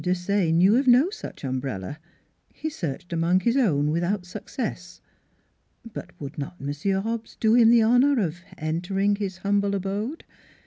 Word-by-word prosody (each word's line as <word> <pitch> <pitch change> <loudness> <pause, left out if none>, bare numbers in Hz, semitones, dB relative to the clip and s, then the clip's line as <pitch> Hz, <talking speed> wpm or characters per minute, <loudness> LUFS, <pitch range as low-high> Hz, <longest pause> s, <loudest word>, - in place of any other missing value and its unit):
Desaye 180 0 +1
knew 185 +7 +5
of 270 +1 +1
no 255 +9 +5
such 435 - -9
umbrella. 130 -2 -4 0.6
He 315 - -4
searched 175 - -5
among 170 +3 +2
his 235 +5 +1
own 150 - +2
without 175 +4 -1
success. 180 0 -6 0.9
But 180 - -7
would 145 0 -7
not 145 +5 -6
Monsieur 150 +8 -1
Hobbs 225 +2 -5
do 220 0 +3
him 235 -1 +6
the 235 -1 +6
honor 250 +4 +4
of 175 -4 -1 0.2
entering 190 +6 0
his 195 -3 -4
humble 200 +1 +1
abode? 205 - -3
195 Hz, 150 wpm, -25 LUFS, 165-225 Hz, 0.9 s, him